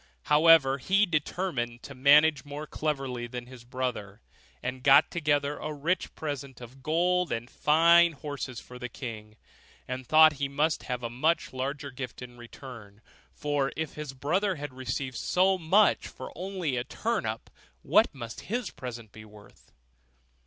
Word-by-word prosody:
However, 150 Hz, -3 st, +5 dB
he 195 Hz, +9 st, +3 dB
determined 150 Hz, -, -2 dB
to 140 Hz, -, -9 dB
manage 145 Hz, +2 st, +5 dB
more 145 Hz, +1 st, -7 dB
cleverly 135 Hz, -6 st, -3 dB
than 120 Hz, 0 st, -7 dB
his 125 Hz, -1 st, -13 dB
brother, 120 Hz, -5 st, -4 dB, 0.4 s
and 125 Hz, +1 st, -4 dB
got 135 Hz, +1 st, +6 dB
together 145 Hz, -3 st, 0 dB
a 155 Hz, -, -4 dB
rich 155 Hz, +5 st, -2 dB
present 140 Hz, -4 st, -5 dB
of 125 Hz, +2 st, -12 dB
gold 175 Hz, +4 st, +1 dB
and 115 Hz, +1 st, -3 dB
fine 170 Hz, +4 st, +5 dB
horses 140 Hz, -3 st, -6 dB
for 125 Hz, 0 st, -12 dB
the 125 Hz, -1 st, -5 dB
king; 110 Hz, -4 st, -8 dB, 0.5 s
and 130 Hz, 0 st, -5 dB
thought 155 Hz, +2 st, +7 dB
he 140 Hz, -, 0 dB
must 150 Hz, +2 st, 0 dB
have 125 Hz, -1 st, -4 dB
a 120 Hz, -, -2 dB
much 155 Hz, +7 st, 0 dB
larger 140 Hz, +2 st, -4 dB
gift 125 Hz, -1 st, -7 dB
in 120 Hz, -1 st, -11 dB
return; 120 Hz, -4 st, -12 dB, 0.3 s
for 145 Hz, -2 st, -1 dB
if 160 Hz, -2 st, -3 dB
his 150 Hz, -3 st, -7 dB
brother 180 Hz, +9 st, 0 dB
had 145 Hz, -3 st, -7 dB
received 130 Hz, 0 st, -4 dB
so 190 Hz, +1 st, +2 dB
much 190 Hz, +6 st, +3 dB
for -, -, -9 dB
only 180 Hz, -7 st, -3 dB
a 120 Hz, -, -1 dB
turnip, -, -, -3 dB, 0.3 s
what -, -, +4 dB
must 115 Hz, -1 st, -8 dB
his 240 Hz, +3 st, -2 dB
present 120 Hz, -4 st, -8 dB
be 110 Hz, +1 st, -12 dB
worth? 105 Hz, -1 st, -18 dB
140 Hz, 155 wpm, -28 LUFS, 125-155 Hz, 0.5 s, thought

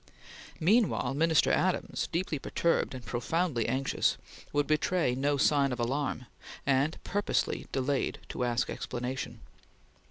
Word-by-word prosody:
Meanwhile 190 Hz, -, +3 dB
Minister 160 Hz, +2 st, +3 dB
Adams, -, -, 0 dB
deeply 165 Hz, -3 st, -1 dB
perturbed 165 Hz, -1 st, 0 dB
and 125 Hz, -, -8 dB
profoundly 125 Hz, 0 st, 0 dB
anxious, 130 Hz, +3 st, +1 dB, 0.3 s
would 145 Hz, 0 st, +2 dB
betray 155 Hz, -2 st, +1 dB
no 140 Hz, +3 st, +1 dB
sign 140 Hz, 0 st, +3 dB
of 125 Hz, -, -3 dB
alarm, 130 Hz, +1 st, -1 dB, 0.4 s
and 140 Hz, +3 st, +2 dB
purposely 205 Hz, +1 st, -1 dB
delayed 135 Hz, +1 st, 0 dB
to -, -, -3 dB
ask 120 Hz, -1 st, +1 dB
explanation. 125 Hz, +2 st, -4 dB
140 Hz, 120 wpm, -30 LUFS, 125-160 Hz, 0.4 s, Meanwhile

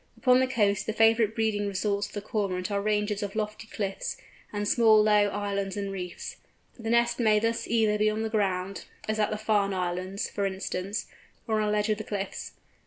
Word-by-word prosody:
Upon 255 Hz, -1 st, +5 dB
the 260 Hz, -, +3 dB
coast 205 Hz, -5 st, +1 dB
the 220 Hz, -, 0 dB
favourite 225 Hz, -1 st, +4 dB
breeding 215 Hz, -3 st, 0 dB
resorts 200 Hz, +1 st, -1 dB
of -, -, -16 dB
the 205 Hz, -, -5 dB
Cormorant 195 Hz, -3 st, -2 dB
are 200 Hz, 0 st, 0 dB
ranges 210 Hz, 0 st, 0 dB
of 200 Hz, 0 st, -4 dB
lofty 215 Hz, +1 st, -3 dB
cliffs, 195 Hz, -2 st, -3 dB, 0.3 s
and 205 Hz, 0 st, -2 dB
small 220 Hz, -1 st, +6 dB
low 210 Hz, -1 st, +4 dB
islands 200 Hz, -1 st, -2 dB
and 200 Hz, -1 st, -2 dB
reefs. 180 Hz, -2 st, -6 dB, 0.4 s
The 225 Hz, -1 st, -4 dB
nest 235 Hz, +1 st, +3 dB
may 215 Hz, -3 st, +4 dB
thus 230 Hz, +2 st, 0 dB
either 220 Hz, -2 st, +2 dB
be 215 Hz, 0 st, +4 dB
on 215 Hz, +1 st, -2 dB
the 220 Hz, -, -1 dB
ground—as 200 Hz, +1 st, -2 dB
at 210 Hz, -, +2 dB
the 215 Hz, -, -2 dB
Farne 210 Hz, -2 st, +1 dB
Islands, 185 Hz, +2 st, -2 dB
for 200 Hz, -1 st, -1 dB
instance—or 195 Hz, +3 st, -4 dB
on 210 Hz, -, +1 dB
a -, -, +1 dB
ledge 210 Hz, +1 st, +1 dB
of 215 Hz, 0 st, +1 dB
the -, -, -3 dB
cliffs. 200 Hz, -2 st, -5 dB
210 Hz, 195 wpm, -28 LUFS, 200-220 Hz, 0.4 s, small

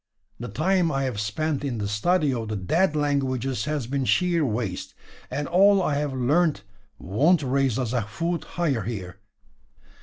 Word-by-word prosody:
The 120 Hz, -, -5 dB
time 175 Hz, +4 st, +1 dB
I 135 Hz, -1 st, 0 dB
have 125 Hz, -6 st, -2 dB
spent 140 Hz, +8 st, -2 dB
in 130 Hz, -5 st, -2 dB
the 105 Hz, -1 st, -2 dB
study 145 Hz, -, +1 dB
of 115 Hz, -3 st, -3 dB
the 110 Hz, -, -3 dB
dead 155 Hz, -, +1 dB
languages 135 Hz, -3 st, 0 dB
has 150 Hz, -4 st, -2 dB
been 135 Hz, +2 st, -2 dB
sheer 175 Hz, +2 st, +2 dB
waste; 110 Hz, -7 st, -3 dB, 0.3 s
and 145 Hz, 0 st, -3 dB
all 195 Hz, +3 st, +5 dB
I 165 Hz, -5 st, 0 dB
have 145 Hz, -1 st, -1 dB
learnt 145 Hz, -, +2 dB, 0.3 s
wont 145 Hz, -, +2 dB
raise 135 Hz, -2 st, +1 dB
us 125 Hz, -3 st, -2 dB
a 125 Hz, -, +1 dB
foot 165 Hz, -, -3 dB
higher 150 Hz, -9 st, +1 dB
here. 95 Hz, -3 st, -6 dB
135 Hz, 170 wpm, -25 LUFS, 115-160 Hz, 0.3 s, all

